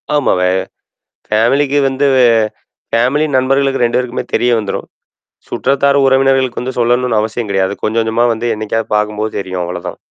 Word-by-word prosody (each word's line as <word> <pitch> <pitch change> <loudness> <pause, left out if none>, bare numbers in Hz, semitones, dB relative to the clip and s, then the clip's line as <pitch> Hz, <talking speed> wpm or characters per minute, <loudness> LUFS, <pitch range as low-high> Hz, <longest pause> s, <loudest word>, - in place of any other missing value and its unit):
ஆமாவே 90 -10 +2 0.8
ஃபேமிலிக்கு 135 +7 +2
வந்து 135 +2 0
வே 130 - +5 0.7
ஃபேமிலி 130 +7 +2
நண்பர்களுக்கு 135 +1 +1
2 120 - 0
பேருக்குமே 125 -1 -3
தெரிய 125 - +2
வந்துரும். 105 -3 -4 0.6
சுற்றத்தார், 140 +1 +1
உறவினர்களுக்கு 135 -2 +2
வந்து 130 +1 -5
சொல்லணும்னு 120 -2 +2
அவசியம் 110 0 -3
கிடையாது. 95 0 0
கொஞ்சம் 115 +1 +1
கொஞ்சமா 115 +2 +1
வந்து 115 +2 -3
என்னைக்காவது 110 +1 -3
பார்க்கும்போது 105 +1 -2
தெரியும். 95 -2 -4
அவ்வளோதான். 90 0 -6
120 Hz, 135 wpm, -14 LUFS, 110-135 Hz, 0.8 s, வே